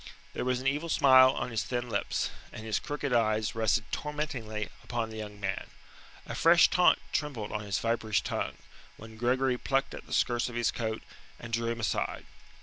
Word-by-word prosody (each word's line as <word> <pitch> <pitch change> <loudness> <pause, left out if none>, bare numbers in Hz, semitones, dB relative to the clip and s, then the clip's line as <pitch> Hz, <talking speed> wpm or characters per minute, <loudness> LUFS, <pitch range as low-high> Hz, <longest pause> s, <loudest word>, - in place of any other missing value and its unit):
There - - -3
was 125 -1 +1
an 130 - -8
evil 145 +5 0
smile 130 -3 +7
on 125 -2 -2
his 110 - 0
thin 125 -1 -3
lips, 115 - -1 0.2
and 110 - -8
his 110 -2 0
crooked 145 -3 -3
eyes 110 -1 +2
rested 110 -1 +2
tormentingly 125 -8 -3
upon 115 -2 -3
the 110 - -7
young 105 -1 -7
man. 95 -1 -3 0.6
A - - -6
fresh 170 +1 +6
taunt 180 0 +5 0.2
trembled 130 -9 -2
on 105 - -2
his 100 - -1
viperish 110 -7 0
tongue, - - -3 0.4
when 110 0 -11
Gregory 125 +2 +1
plucked 135 0 0
at - - -9
the - - -7
skirts 120 0 +1
of 120 - -9
his 120 -1 +1
coat, 110 -1 -3 0.3
and 120 -1 -9
drew 115 0 0
him 115 - -4
aside. 110 - -2
120 Hz, 190 wpm, -30 LUFS, 110-130 Hz, 0.6 s, smile